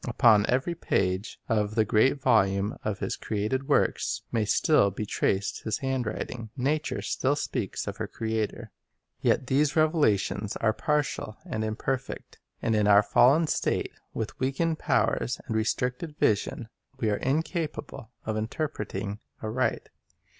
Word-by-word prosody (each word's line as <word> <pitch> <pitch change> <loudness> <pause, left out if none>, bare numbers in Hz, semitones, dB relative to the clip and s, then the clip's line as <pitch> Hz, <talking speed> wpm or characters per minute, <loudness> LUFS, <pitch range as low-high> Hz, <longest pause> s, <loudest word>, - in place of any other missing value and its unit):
Upon 110 -3 +5
every 130 +7 +1
page 95 - -1
of 105 -1 0
the 110 -2 +3
great 120 +7 +3
volume 100 -6 +2
of 105 -2 -2
His - - -2
created 110 +6 -2
works - - +1
may 110 -2 +1
still 105 -1 +4
be 100 +2 -4
traced 100 -1 -1
His 110 -2 -1
handwriting. 125 -3 -3
Nature 150 +4 -1
still 135 +2 +1
speaks 145 - -3
of - - -5
her - - -3
Creator. 110 -1 -3 0.5
Yet - - +2
these 140 +3 +2
revelations 110 - +2
are 110 -1 +1
partial 145 -7 -1
and 110 - -3
imperfect. 130 +4 -4 0.2
And 115 -2 +2
in 105 -1 +3
our 105 0 +7
fallen 140 +9 +5
state, - - 0 0.2
with 110 -1 -5
weakened 155 +5 0
powers 60 - +1
and 110 - -3
restricted 125 +7 -1
vision, 110 +2 0 0.3
we 110 -4 +1
are 105 - +1
incapable 155 -4 -2 0.2
of 110 -1 -1
interpreting 110 -4 -3 0.2
aright. 115 +4 -1
115 Hz, 140 wpm, -27 LUFS, 105-135 Hz, 0.5 s, our